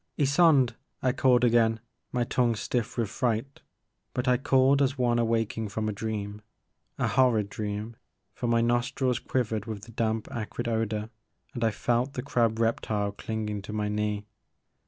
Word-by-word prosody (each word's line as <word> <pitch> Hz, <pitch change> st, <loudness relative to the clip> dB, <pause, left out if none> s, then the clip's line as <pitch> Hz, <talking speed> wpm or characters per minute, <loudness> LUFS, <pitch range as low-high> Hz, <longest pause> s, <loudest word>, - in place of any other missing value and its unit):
"Ysonde!" 140 Hz, -4 st, +4 dB, 0.3 s
I 130 Hz, -, +3 dB
called 125 Hz, -1 st, +3 dB
again, 115 Hz, -2 st, +4 dB, 0.3 s
my 125 Hz, -1 st, +1 dB
tongue 120 Hz, -1 st, +1 dB
stiff 120 Hz, +2 st, -2 dB
with 115 Hz, -2 st, +1 dB
fright; 120 Hz, +4 st, -2 dB, 0.3 s
— -, -, -50 dB
^but 125 Hz, +1 st, -1 dB
I 125 Hz, 0 st, +4 dB
called 135 Hz, +2 st, +3 dB
as 135 Hz, 0 st, +1 dB
one 120 Hz, -2 st, +2 dB
awaking 115 Hz, -1 st, 0 dB
from 110 Hz, +2 st, -2 dB
a -, -, 0 dB
dream 105 Hz, 0 st, -4 dB, 0.3 s
— -, -, -49 dB, 0.2 s
a -, -, +1 dB
horrid 120 Hz, -6 st, +3 dB
dream, 105 Hz, +2 st, -4 dB, 0.4 s
for 120 Hz, -, -3 dB
my 115 Hz, 0 st, +3 dB
nostrils 125 Hz, +1 st, +1 dB
quivered 110 Hz, -5 st, -1 dB
with 105 Hz, -2 st, -5 dB
the 115 Hz, -, -11 dB
damp 110 Hz, -1 st, -1 dB
acrid 110 Hz, 0 st, -4 dB
odor 110 Hz, -1 st, -1 dB, 0.4 s
and 120 Hz, -, -3 dB
I 115 Hz, -, +4 dB
felt 120 Hz, +5 st, 0 dB
the 125 Hz, -, -4 dB
crab 115 Hz, -5 st, +1 dB
rep 115 Hz, 0 st, +1 dB
tile 105 Hz, -2 st, -1 dB
clinging 105 Hz, 0 st, -4 dB
to 105 Hz, +2 st, -8 dB
my 105 Hz, -1 st, -1 dB
knee. 105 Hz, 0 st, -1 dB
115 Hz, 175 wpm, -28 LUFS, 110-125 Hz, 0.4 s, Ysonde